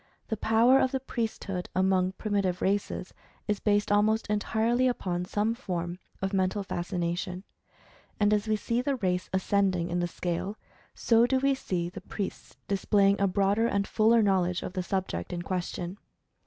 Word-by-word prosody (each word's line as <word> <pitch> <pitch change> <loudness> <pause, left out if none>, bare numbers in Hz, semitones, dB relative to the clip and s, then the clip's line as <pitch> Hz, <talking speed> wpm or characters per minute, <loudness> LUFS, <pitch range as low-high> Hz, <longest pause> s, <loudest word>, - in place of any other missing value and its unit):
The 220 - 0
power 230 +5 +4
of 260 - +2
the 265 - 0
priesthood 220 -7 -4
among 185 0 +2
primitive 195 -3 -1
races, 195 -1 -1 0.3
is 210 -2 0
based 205 -1 +1
almost 215 +2 +3
entirely 225 +4 +1
upon 180 -7 -1
some 210 +4 0
form 180 -7 -4 0.2
of 195 +1 -1
Mental 190 +1 +1
Fascination. 180 0 -3 0.8
And, 205 0 +4
as 210 +1 +1
we 215 - +2
see 230 +3 -1
the 275 +1 0
race 185 -6 -1
ascending 190 -2 +1
in 175 - 0
the 175 - 0
scale, 175 +4 -3 0.4
so 230 0 +4
do 265 - +2
we 275 +1 +2
see 180 -9 -2
the 180 +2 -8
priests 195 +1 -6
displaying 200 0 +2
a 200 - +4
broader 200 +4 +2
and 200 -3 0
fuller 225 +1 +4
knowl 190 -3 +3
edge 180 0 -2
of - - -5
the 185 - -1
subject 180 - -3
in 175 -1 -3
question. 180 +1 -4
200 Hz, 170 wpm, -28 LUFS, 180-220 Hz, 0.8 s, power